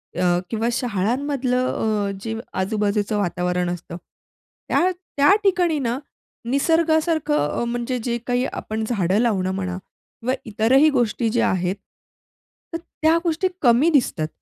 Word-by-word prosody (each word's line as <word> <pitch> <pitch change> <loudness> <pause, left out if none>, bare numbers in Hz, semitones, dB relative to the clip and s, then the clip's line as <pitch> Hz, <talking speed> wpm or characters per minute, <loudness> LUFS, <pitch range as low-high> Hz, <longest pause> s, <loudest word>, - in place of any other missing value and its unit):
अ, 175 0 +2
किंवा 225 0 -1
शाळांमधलं 250 +4 0 0.4
अ, - - -2
जे 225 +1 -4 0.3
आजूबाजूचं 210 +1 0
वातावरण 180 -2 -1
असतं 175 -1 -6 0.7
त्या 365 - +3 0.3
त्या 290 +7 +6
ठिकाणी 355 -5 +2
ना 245 -2 -1 0.5
निसर्गासारखं 315 - +1
म्हणजे 240 +1 -2
जे 235 0 -1
काही 245 +1 +1
आपण 220 +1 -4
झाडं 195 -4 +1
लावणं 195 -6 +1
म्हणा 185 -1 -3 0.4
किंवा 250 +3 -1
इतरही 230 +8 +4
गोष्टी 240 -4 +1
ज्या 235 +1 +2
आहेत, 185 0 0 1.0
तर - - 0 0.2
त्या 320 +1 +4
गोष्टी 335 +2 +1
कमी 250 +5 +5
दिसतात. 240 - +1
235 Hz, 125 wpm, -22 LUFS, 195-280 Hz, 1.0 s, त्या